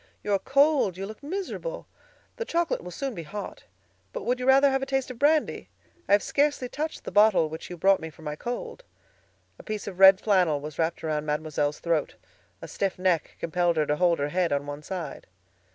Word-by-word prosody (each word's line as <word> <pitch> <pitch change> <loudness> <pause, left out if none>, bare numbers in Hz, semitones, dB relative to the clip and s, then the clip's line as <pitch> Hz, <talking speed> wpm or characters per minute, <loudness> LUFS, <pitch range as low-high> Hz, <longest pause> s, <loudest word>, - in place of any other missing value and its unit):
"You 205 - -1
are 200 - +3
cold; 275 - +2
you 195 - -4
look 215 +5 -10
miserable. 395 +10 -5 0.5
The 465 - -2
chocolate 340 -5 -1
will 180 - -7
soon 270 +8 -4
be 170 - -6
hot. 195 +6 -8 0.5
But - - -5
would 250 +1 0
you 250 - -3
rather 275 +1 +6
have 270 0 0
a - - -1
taste 270 -1 -1
of 240 - -11
brandy? 300 +2 +1 0.4
I - - +4
have 205 - +5
scarcely 285 -3 +1
touched 305 +5 -5
the - - -6
bottle 205 -5 +4
which 160 +1 -8
you 175 - -7
brought 195 +3 +4
me 160 - -6
for 160 +1 -16
my 150 -1 -4
cold." 245 - -6 0.8
A - - -11
piece 215 -2 -5
of 190 -2 -7
red 190 0 +9
flannel 180 -8 +2
was 150 +2 -8
wrapped 165 0 -1
around 155 -1 -2
Mademoiselle's 150 -1 -1
throat; 165 -3 -1 0.5
a - - -6
stiff 195 -2 -2
neck 180 -3 0
compelled 170 0 0
her 155 - +2
to 150 0 0
hold 175 -1 +3
her 145 +1 -1
head 180 +2 0
on 145 0 0
one 145 0 -6
side. 170 -3 -6
190 Hz, 215 wpm, -26 LUFS, 160-265 Hz, 0.8 s, red